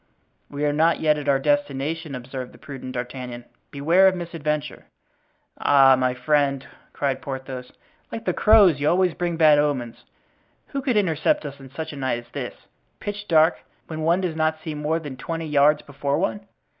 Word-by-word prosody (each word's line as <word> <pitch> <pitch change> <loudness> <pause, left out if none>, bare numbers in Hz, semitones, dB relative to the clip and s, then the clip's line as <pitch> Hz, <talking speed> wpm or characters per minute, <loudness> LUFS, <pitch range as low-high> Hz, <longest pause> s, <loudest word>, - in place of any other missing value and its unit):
"We 145 +1 -3
are 145 - +1
not 160 +3 +3
yet 150 -1 +2
at 145 -1 -3
our 140 - +4
destination," 145 +2 -1
observed 125 0 -7
the - - -15
prudent 130 -2 -8
D'Artagnan; 125 -1 -6 0.2
"beware 165 +7 +4
of 190 - +3
misadventure." 155 -4 -4 0.7
"Ah, 135 -2 +6
my 130 -1 0
friend!" 140 +1 +1 0.3
cried 135 -2 -2
Porthos, 130 -3 -6 0.4
"like 225 0 -6
the - - +1
crows, 205 -9 +5
you 145 +1 +2
always 180 -1 +2
bring 175 -2 -2
bad 155 -2 +6
omens. 135 -6 -2 0.6
Who 275 - -3
could 255 -5 0
intercept 160 -6 +1
us 140 -1 -7
on 135 -1 -12
such 160 +3 -6
a - - -8
night 130 -3 -1
as 120 0 -12
this, - - -5 0.4
pitch 205 0 -6
dark, 160 0 +4 0.3
when 160 -1 -6
one 170 +4 +2
does 175 -4 -2
not 155 0 0
see 160 - -4
more 150 +2 -1
than 145 -5 -7
twenty 165 +4 -4
yards 150 0 +3
before 140 0 -2
one?" 200 +3 -2
150 Hz, 180 wpm, -23 LUFS, 135-165 Hz, 0.7 s, Ah